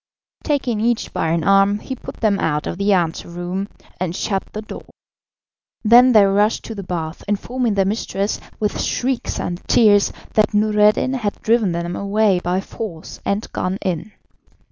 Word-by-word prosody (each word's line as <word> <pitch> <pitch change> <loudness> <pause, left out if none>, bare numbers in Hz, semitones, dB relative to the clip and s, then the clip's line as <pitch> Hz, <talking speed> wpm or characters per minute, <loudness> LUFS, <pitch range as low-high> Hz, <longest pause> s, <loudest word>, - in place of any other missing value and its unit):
Taking 265 -7 0
each 235 +1 0
by - - -1
an 165 0 0
arm, 195 +2 +4
he 260 +5 -6
put - - -9
them 205 -3 +2
out 150 -4 0
of 175 - -4
the 200 +1 +2
anteroom, 175 +1 -1 0.3
and 180 -1 -2
shut 195 -1 -1
the 215 - -6
door. - - -9 1.0
Then 240 +3 +7
they 210 -2 +7
rushed 205 +3 +2
to 225 - -6
the 200 - -6
bath, 170 -3 -5
informing 225 +2 -1
their 195 -1 +2
mistress 200 0 -2 0.2
with 210 -1 -1
shrieks 255 -1 -1
and 175 0 -4
tears 205 -3 +5 0.2
that 215 0 +2
Noureddin 210 +4 +3
had 215 -6 -2
driven 225 -4 +2
them 170 +1 -3
away 200 -1 +2
by 180 +2 -1
force 195 -6 -8
and 200 +2 -1
gone 185 +1 -2
in. 185 +2 -3
200 Hz, 165 wpm, -20 LUFS, 185-220 Hz, 1.0 s, Then